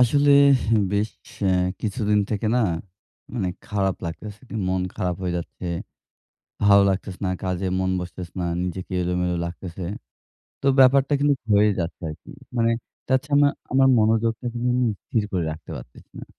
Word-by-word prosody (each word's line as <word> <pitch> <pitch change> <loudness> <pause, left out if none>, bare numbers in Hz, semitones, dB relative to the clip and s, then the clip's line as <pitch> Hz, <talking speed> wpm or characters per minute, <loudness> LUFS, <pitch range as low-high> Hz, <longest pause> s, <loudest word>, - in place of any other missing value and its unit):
আসলে 140 +4 +4 0.6
বেশ 105 +1 +1 0.3
অ্যা 95 -1 +3 0.3
কিছুদিন 105 -1 0
থেকে 110 0 -1
না - - +3 0.7
মানে 95 -7 -1 0.2
খারাপ 95 -2 0
লাগতেছে। 105 +6 -7 0.3
মন 95 0 0
খারাপ 90 -4 -1
হয়ে 90 -1 -1
যাচ্ছে। 85 +1 -6 1.0
ভালো 100 0 +7
লাগতেছে 95 0 -4
না, 95 - 0
কাজে 95 0 -2
মন 95 0 0
বসতেসে 90 0 -8
না, 90 - -1 0.2
নিজেকে 90 +1 -5
এলোমেলো 90 0 0
লাগতেছে। 85 +1 -7 0.8
তো - - 0
ব্যাপারটা 135 +2 +5
কিন্তু 145 0 +3 0.2
হয়ে 105 +1 +5
যাচ্ছে 85 +1 -4
আরকি। 75 - -10 0.3
মানে 115 0 +3 0.4
তাছাড়া 145 +2 +3 0.2
আমার 135 +1 +5
মনোযোগটা 115 +2 +1
কিন্তু 120 +1 -2
আমি 125 -1 +2 0.2
স্থির 110 - 0
করে 90 -3 0
রাখতে 80 +1 -9
পারতেছি - - -14
না। - - -8
100 Hz, 145 wpm, -24 LUFS, 90-120 Hz, 1.0 s, ভালো